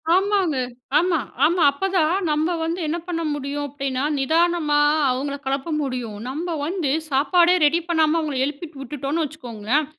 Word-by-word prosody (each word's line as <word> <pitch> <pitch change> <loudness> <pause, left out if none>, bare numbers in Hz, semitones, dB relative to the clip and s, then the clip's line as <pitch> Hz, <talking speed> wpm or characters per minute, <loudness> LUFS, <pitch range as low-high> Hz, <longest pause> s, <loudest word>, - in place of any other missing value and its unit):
ஆமாங்க, 385 -6 +2 0.4
ஆமா, 345 -1 +2 0.3
ஆமா. 340 +1 +3
அப்பதான் 355 0 +1 0.2
நம்ம 315 +4 +1
வந்து 330 +2 -2
என்ன 325 - -1
பண்ண 335 -2 -2
முடியும் 290 0 -3
அப்டின்னா, 275 -1 -3 0.2
நிதானமா 320 +1 +2 0.3
அவங்கள 275 +3 -2
கிளப்ப 275 +4 -2
முடியும். 250 -6 -4
நம்ப 335 +6 -4
வந்து 335 -5 -1 0.2
சாப்பாடே 340 +6 +4
ரெடி 330 +3 +3
பண்ணாம 320 -1 +2
அவங்கள 300 -4 -3
எழுப்பிட்டு 295 0 -7
விட்டுட்டோன்னு 285 +4 -2
வச்சுக்கோங்களேன் 260 -2 -2
305 Hz, 140 wpm, -22 LUFS, 275-340 Hz, 0.4 s, சாப்பாடே